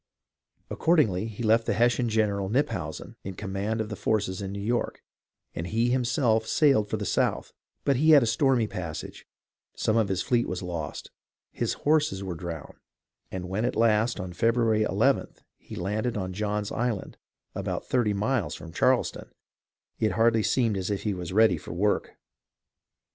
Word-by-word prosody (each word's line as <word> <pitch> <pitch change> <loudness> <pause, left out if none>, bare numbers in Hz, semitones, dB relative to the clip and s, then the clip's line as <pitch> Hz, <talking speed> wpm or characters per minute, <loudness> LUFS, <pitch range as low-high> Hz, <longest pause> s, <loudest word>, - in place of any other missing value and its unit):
Accordingly, 115 - +2
he 110 +2 -6
left 115 +1 +3
the - - +1
Hessian 120 0 +2
general, 100 -3 0
Knyphausen, 130 +7 -2
in 95 -1 -6
command 105 +3 -3
of 110 -1 -2
the 105 - -4
forces 100 -3 -1
in 95 -1 -4
New 100 - -5
York, 115 +4 -2 0.5
and 80 - -4
he 115 +5 +1
himself 120 -3 +1
sailed 135 -9 +3
for - - -1
the - - -4
South; - - 0 0.3
but 140 -2 +3
he 155 +4 +3
had 145 -4 +8
a - - +2
stormy 120 +1 +2
passage, 85 -6 -6 0.5
some 110 - +1
of 110 -3 +3
his 95 -1 -1
fleet 120 -1 +1
was 90 0 -4
lost, 85 -4 -5 0.4
his - - -1
horses 150 -9 +2
were 95 -2 -4
drowned, 85 -2 -7 0.5
and 90 -1 -5
when 95 +4 -2
at 125 - 0
last 115 0 +2
on 90 -2 -5
February 115 +1 +2
i - - +3
ith - - -16 0.2
he - - -10
landed 105 +6 -2
on 95 -2 -3
John's 105 +1 -2
Island, 120 -4 -3 0.3
about - - -3
thirty 120 -5 +1
miles 105 - 0
from 80 0 -10
Charleston, - - +1 0.7
it 110 -3 +1
hardly 115 +1 +3
seemed 115 -2 +1
as 95 +1 -3
if 100 -1 -2
he 105 - 0
was 90 -2 -5
ready 105 -4 +4
for - - -8
work. 100 +4 0
110 Hz, 170 wpm, -27 LUFS, 95-120 Hz, 0.7 s, had